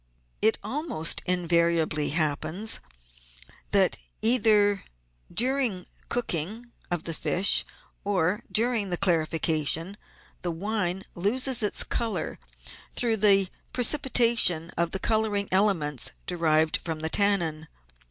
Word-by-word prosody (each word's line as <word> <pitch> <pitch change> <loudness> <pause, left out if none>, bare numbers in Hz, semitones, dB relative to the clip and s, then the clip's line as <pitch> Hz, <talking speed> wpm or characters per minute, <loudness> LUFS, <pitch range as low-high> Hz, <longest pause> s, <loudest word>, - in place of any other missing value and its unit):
It 220 +1 +3
almost 275 - -1
invariably 170 -3 +1
happens 155 +7 -1 0.9
that, - - +3 0.2
either 210 -4 +3 0.5
during 250 -6 0
the - - -26 0.2
cook 245 -4 -2
ing 215 +10 -4 0.2
of 175 -2 -2
the 165 - -4
fish 185 +4 +3 0.4
or 190 -1 0
during 225 -3 0
the 175 - -2
clarification, 165 0 +1 0.5
the 175 - -3
wine 190 +1 -3
loses 240 +7 +2
its 210 - +2
colour 230 -2 -3 0.6
through 230 -2 0
the 195 -2 +3 0.3
precipitation 235 - +2
of 170 0 0
the 190 - -3
colouring 210 -1 -1
elements 160 - +1
de 180 - -4
rived 160 -2 +2
from 160 -2 -6
the 160 - -2
tannin. 170 -6 +1
190 Hz, 115 wpm, -26 LUFS, 165-220 Hz, 0.9 s, It